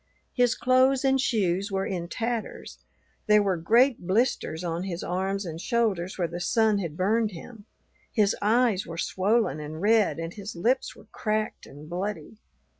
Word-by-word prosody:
His 245 -2 +2
clothes 255 +2 +3
and 270 0 +3
shoes 200 -5 0
were 195 0 -1
in 175 -3 -3
tatters; 230 +4 -4 0.5
there 210 -1 +5
were 195 -2 +1
great 230 +5 +2
blisters 190 -5 0
on 170 0 -2
his 175 -2 -4
arms 190 +2 -2
and 165 -1 -6
shoulders 210 -7 0
where 175 -3 0
the 170 +2 -6
sun 215 +2 +2
had 165 -5 -5
burned 215 +3 +1
him; 205 +5 -11 0.5
his 210 -3 +2
eyes 215 -1 +2
were 165 - -7
swollen 200 +1 +1
and 150 +1 -7
red, 215 +2 +3
and 165 +1 -5
his 205 -1 -8
lips 240 +10 0
were - - -16
cracked 215 0 -2
and 145 +2 -12
bloody. 180 +2 -5
200 Hz, 165 wpm, -26 LUFS, 175-230 Hz, 0.5 s, there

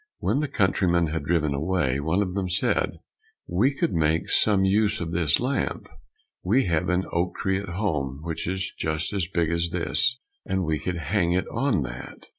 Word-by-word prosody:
When - - 0
the 150 - 0
countryman 95 - +2
had 80 -3 -3
driven 75 -2 +1
away, 70 -3 0
one 80 +7 +1
of 90 -2 -4
them 95 -2 -2
said, 90 - 0 0.5
"We 100 +10 +2
could 135 - -1
make 80 0 +1
some 100 -3 +3
use 105 +2 +2
of 85 -1 -4
this 80 -5 +2
lamp, 130 +3 -1 0.5
we 115 +9 +2
have 85 0 0
an 90 +1 +1
oak 85 +1 0
tree 95 0 0
at 100 -2 -7
home, 75 -8 -2
which 85 -1 -4
is 95 +1 -2
just 80 +4 -1
as 95 -4 0
big 85 -3 0
as 85 0 0
this, 125 +9 0 0.2
and 95 -1 -1
we 80 -2 0
could 90 +3 -3
hang 85 +2 +1
it 90 0 +1
on 115 - +1
that. - - -9
90 Hz, 190 wpm, -25 LUFS, 80-95 Hz, 0.5 s, some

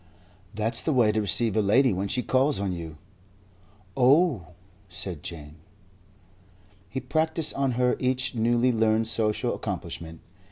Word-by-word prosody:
"That's 110 +2 +3
the 155 - 0
way 120 -5 +4
to 110 0 0
receive 105 +1 +1
a 110 - +3
lady 120 +4 +3
when 95 +2 -2
she 125 +4 -1
calls 135 +1 +1
on 100 -2 -2
you. 85 -3 -7 1.0
"Oh!" 135 - +3 0.4
said 90 -3 -6
Jane. 75 -2 -9 1.3
He 130 - -4
practised 160 +2 -1
on 135 -2 -1
her 125 +1 +1
each 130 0 -1
newly 120 +2 +2
learned 110 -1 +1
social 110 -2 -1
accomplishment. 80 0 -6
115 Hz, 135 wpm, -26 LUFS, 100-130 Hz, 1.3 s, way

